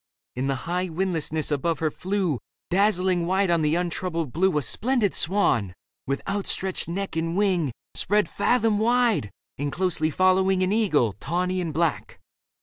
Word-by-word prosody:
In 130 +2 -2
the 135 - 0
high 180 +2 -1
windlessness 160 -3 -1
above 155 +3 0
her 155 -2 -1
flew, 185 - -1 0.3
Dazzlingly 185 -2 +2
white 190 +1 +1
on 170 -1 +2
the 150 +1 +1
untroubled 170 -4 -2
blue, 185 0 +2
A 150 - 0
splendid 225 - +1
swan, 135 - +2 0.3
with 140 +1 -2
outstretched 195 -2 -1
neck 195 +2 -4
and 165 +2 -1
wing 185 -8 +1 0.2
Spread 210 +1 +1
fathom 225 -4 +1
wide, 235 - +2 0.3
and 145 0 -2
closely 170 -3 0
following 185 +3 +2
An 185 - 0
eagle, 155 - +2
tawny 180 +4 -1
and 170 -3 -3
black. 160 -2 -2
180 Hz, 150 wpm, -25 LUFS, 155-195 Hz, 0.3 s, Dazzlingly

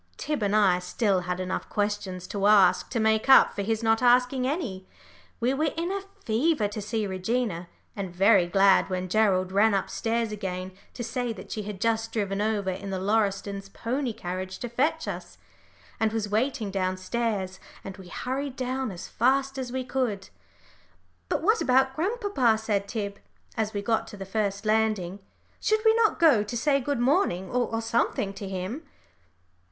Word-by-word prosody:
Tib 300 -5 -2
and 205 0 +1
I 205 -4 +5
had 180 - 0
still 195 +1 +1
enough 185 +1 -3
questions 205 -3 -2
to 200 -1 0
ask 190 -4 +5
to 240 - -1
make 220 +2 +2
up 265 - +8
for - - -3
his 220 +2 -1
not 225 +1 +3
asking 250 +1 +3
any. 250 - -3 0.5
We 245 +2 +1
were 305 +2 0
in 340 +2 -1
a 395 0 -2 0.2
fever 235 +1 +2
to 210 +1 -5
see 215 +1 -2
Regina, 190 -2 -2 0.3
and 195 -2 -4
very 190 +1 +4
glad 195 +2 +4
when 185 0 -2
Gerald 190 -3 +2
ran 205 +2 +4
up 195 - -2
stairs 230 -1 -1
again 185 -3 -4 0.2
to 240 - -4
say 240 0 -2
that - - -11
she 215 - -3
had 205 -2 -6
just 225 0 0
driven 200 -3 -1
over 210 -3 0
in 195 +2 -6
the 190 - -2
Lauristons' 200 0 -1
pony 255 +4 -2
carriage 185 -1 -5
to 245 - -5
fetch 310 +7 0
us, - - -6 0.6
and 220 -1 +2
was 220 -2 -2
waiting 220 0 -1
downstairs, 190 +1 -2 0.2
and 195 0 -8
we 190 -2 -12
hurried 260 +7 -4
down 260 0 -2
as 180 -3 -7
fast 270 +3 +1
as 250 -2 -4
we 260 0 -2
could. 245 -7 -2 1.0
"But - - -1
what 435 +5 +3
about 265 +1 +3
grandpapa?" 365 - +1
said 210 -2 -1
Tib, 200 -3 -4 0.4
as 220 -1 -1
we 205 -2 -4
got 225 +1 0
to 205 - -10
the 195 - -6
first 200 0 -2
landing. 215 -4 +1 0.4
"Should 435 0 +1
we 445 - +7
not 450 -1 +3
go 305 -10 +5
to 210 +3 -4
say 275 +3 +2
good 285 0 -1
morning 240 - +1
or 235 -2 -1
something 225 -3 0
to 195 -1 -7
him?" 190 - -4
220 Hz, 180 wpm, -27 LUFS, 195-250 Hz, 1.0 s, up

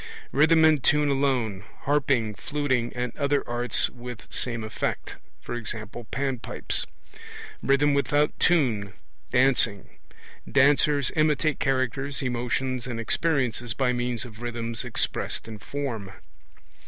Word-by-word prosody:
Rhythm 160 +3 +5
and 155 -4 +4
tune 150 0 +3
alone, 130 -8 0 0.2
harping, 135 -6 +1
fluting, 130 -1 -1
and 125 -1 -3
other 140 -1 +1
arts 120 -1 +1
with 125 -1 -9
same 115 -3 -1
effect 110 - -3 0.3
e.g. 120 -1 -4 0.3
panpipes. 135 -3 -2 0.7
Rhythm 140 +1 +3
without 145 +1 +1
tune: 120 - +2 0.4
dancing. 125 -5 +2 0.6
(Dancers 140 0 +4
imitate 155 -1 +2
characters, 135 +1 0
emotions, 125 0 -1
and 120 -2 -4
experiences 120 -3 0
by 130 -2 +1
means 120 -1 -2
of 110 -2 -12
rhythms 115 -1 -4
expressed 120 -1 -1
in 110 -2 -8
form.) 115 -7 -4
130 Hz, 110 wpm, -26 LUFS, 120-140 Hz, 0.7 s, Rhythm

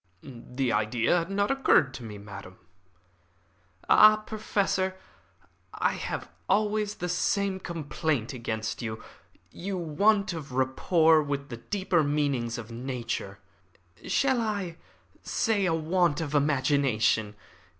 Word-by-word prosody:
"The 125 -1 -3
idea 110 +7 +1
had 170 +2 -4
not 200 +3 +1
occurred 270 - +3
to 125 - -8
me, 105 -2 -8
madam." 100 -2 -10 1.3
"Ah, 215 0 +8
Professor, 205 -3 -1 0.8
I - - +1
have - - -4 0.2
always 210 +1 +1
the 180 - -4
same 190 +2 0
complaint 155 -7 -2
against 110 -2 -4
you. 110 -2 -5 0.5
A 195 +3 -5
want 195 +4 +2
of 145 -5 -7
rapport 155 +5 +3
with 140 -1 -4
the 120 - -6
deeper 190 - 0
meanings 140 -5 0
of 115 -1 -8
nature. 120 -5 -4 0.7
Shall 265 -3 +2
I 200 -6 -3 0.4
say 215 -4 0
a 165 - +1
want 165 -1 +1
of 155 -3 -4
imagination. 135 -7 +2
150 Hz, 120 wpm, -27 LUFS, 125-190 Hz, 1.3 s, Ah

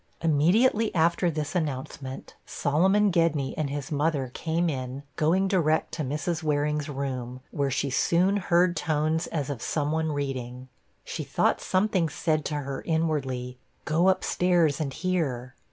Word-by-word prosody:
Immediately 195 - +3
after 170 +2 +3
this 155 -2 -3
announcement, 135 -5 -4
Solomon 190 +8 +2
Gedney 165 -6 +1
and 150 -3 -1
his 145 +2 -5
mother 145 -3 0
came 165 +2 -1
in, 130 -2 -4
going 180 +5 +2
direct 160 -5 +1
to 155 - -3
Mrs. 155 +5 -2
Waring's 150 -1 0
room, 130 -3 -4
where 140 -2 0
she 135 +1 -1
soon 180 +9 +2
heard 180 -2 +2
tones 155 +1 0
as 145 -3 -3
of 130 -5 -6
some 150 -1 -1
one 160 0 0
reading. 130 -3 -4 0.4
She - - -4
thought - - +1
something 185 -3 +1
said 155 -1 -1
to 150 - -2
her 140 -2 -4
inwardly, 135 -6 -1 0.3
'Go 165 +4 +2
up 190 - +3
stairs 175 -5 +2
and 140 -3 -2
hear.' 135 -8 -2
155 Hz, 150 wpm, -27 LUFS, 140-170 Hz, 0.4 s, Immediately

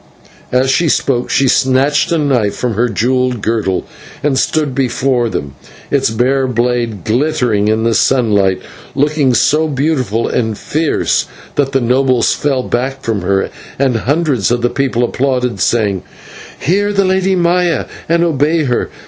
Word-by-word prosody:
As 130 +1 +2
she 165 +3 +2
spoke 125 -4 0
she 135 - +2
snatched 135 +5 +2
a 170 - +2
knife 130 -9 +1
from 125 -2 -2
her 120 +4 0
jewelled 125 +1 0
girdle, 110 -4 -1 0.4
and 145 -2 +1
stood 145 +1 0
before 125 -2 0
them, 70 -9 -4 0.4
its 140 -4 +2
bare 130 +4 +1
blade 120 -5 -1
glittering 120 -4 0
in 110 +1 +1
the 115 0 +2
sunlight, 105 -7 +2 0.3
looking 145 -2 +2
so 150 +7 +2
beautiful 135 -6 -1
and 110 -3 -1
fierce 155 0 0 0.3
that 135 -2 0
the 135 -1 +1
nobles 125 0 +2
fell 135 -3 -1
back 130 +3 -3
from 110 -4 -1
her, 95 +2 0 0.3
and 135 -2 +1
hundreds 140 - 0
of 120 0 0
the 120 - +1
people 130 -3 0
applauded, 125 -3 -1
saying: 100 -2 +1 0.6
"Hear 200 +7 +1
the 200 -1 +2
Lady 190 0 +1
Maya, 175 -1 +1 0.2
and 170 +1 +3
obey 155 0 +1
her. 125 -4 -1
130 Hz, 150 wpm, -14 LUFS, 115-145 Hz, 0.6 s, and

